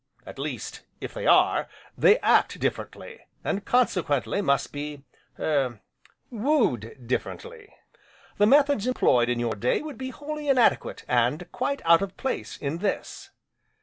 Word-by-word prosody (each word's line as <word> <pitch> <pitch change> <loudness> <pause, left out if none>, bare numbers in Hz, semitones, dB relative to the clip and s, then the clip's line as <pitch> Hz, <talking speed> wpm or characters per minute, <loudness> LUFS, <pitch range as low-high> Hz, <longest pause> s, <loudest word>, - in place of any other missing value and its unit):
At - - -10
least, - - -5 0.2
if - - -7
they - - -4
are, - - +4 0.3
they 430 - +5
act - - +3
differently, 475 -1 -4 0.2
and 200 - -2
consequently 180 - +1
must 140 -7 0
be 145 -1 -6 0.3
er 135 -7 0 0.5
wooed 210 - 0
differently. 460 - -5 0.7
The 205 - +5
methods 280 -3 +4
employed 125 - +3
in 120 -1 0
your 120 -2 -1
day 120 - 0
would 305 -3 -8
be 260 0 -4
wholly 295 +2 -6
inadequate 260 -3 +2
and - - 0
quite 280 - -2
out 165 +1 +6
of 195 -1 -5
place, 265 - -4
in 145 +3 -4
this. 200 +1 -3
200 Hz, 140 wpm, -26 LUFS, -, 0.7 s, out